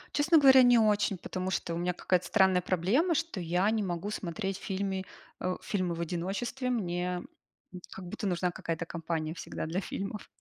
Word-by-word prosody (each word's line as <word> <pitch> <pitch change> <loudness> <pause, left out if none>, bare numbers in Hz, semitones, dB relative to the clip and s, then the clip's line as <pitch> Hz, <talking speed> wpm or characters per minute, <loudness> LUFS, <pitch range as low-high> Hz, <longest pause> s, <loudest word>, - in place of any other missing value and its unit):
Честно 315 +3 +5
говоря, 265 -2 +8
не 245 -1 +6
очень, 210 -3 +3
потому 185 +1 -4
что 170 -2 -2
у - - -2
меня 180 +1 0
какая-то 180 0 0
странная 190 -1 +4
проблема, 200 - +2
что 320 - -2
я 180 +4 +1
не 220 -1 +1
могу 185 +2 -3
смотреть 195 +1 -3
фильмы, 190 -1 -3 0.4
э, 185 0 0
фильмы 185 -4 -1
в 170 - -4
одиночестве. 195 +10 -2
Мне, 180 -5 -1 0.5
м, 180 - -8
как 190 - -8
будто 200 - -4
нужна 180 0 0
какая-то 165 -1 -4
компания 160 -1 -3
всегда 165 - -5
для 170 +4 -1
фильмов. 200 +2 -5
185 Hz, 180 wpm, -30 LUFS, 175-210 Hz, 0.5 s, говоря